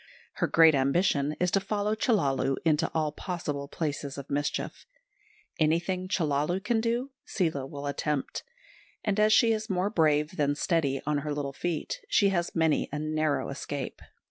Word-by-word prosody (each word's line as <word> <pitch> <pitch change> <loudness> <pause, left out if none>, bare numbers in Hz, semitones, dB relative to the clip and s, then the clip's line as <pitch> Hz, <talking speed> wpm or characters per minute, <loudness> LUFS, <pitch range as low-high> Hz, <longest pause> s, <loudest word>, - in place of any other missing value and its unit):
Her - - +1
great 160 -1 +6
ambition 140 +1 +2
is 180 -1 +1
to 195 - +3
follow 210 +1 -1
Chellalu 145 - +1
into 160 0 +2
all 155 -2 0
possible 150 -4 -4
places 145 -2 -4
of 140 0 -8
mischief. 145 +1 -2 0.7
Anything 175 +4 +1
Chellalu 160 -1 0
can 225 +1 +1
do 240 +4 -1
Seela 160 -8 -1
will 140 0 -7
attempt; 145 0 -2 0.6
and 210 -1 0
as 215 0 +5
she 225 +1 +5
is 215 -1 -2
more 190 +1 0
brave 155 -2 +2
than 145 -1 +1
steady 145 -4 0
on 150 0 +1
her 150 +1 -4
little 140 -2 -3
feet, 170 +1 -3
she 200 - +4
has 175 -3 -1
many 160 -2 +2
a 150 - -3
narrow 155 -1 0
escape. 140 0 -5
155 Hz, 160 wpm, -28 LUFS, 145-185 Hz, 0.7 s, great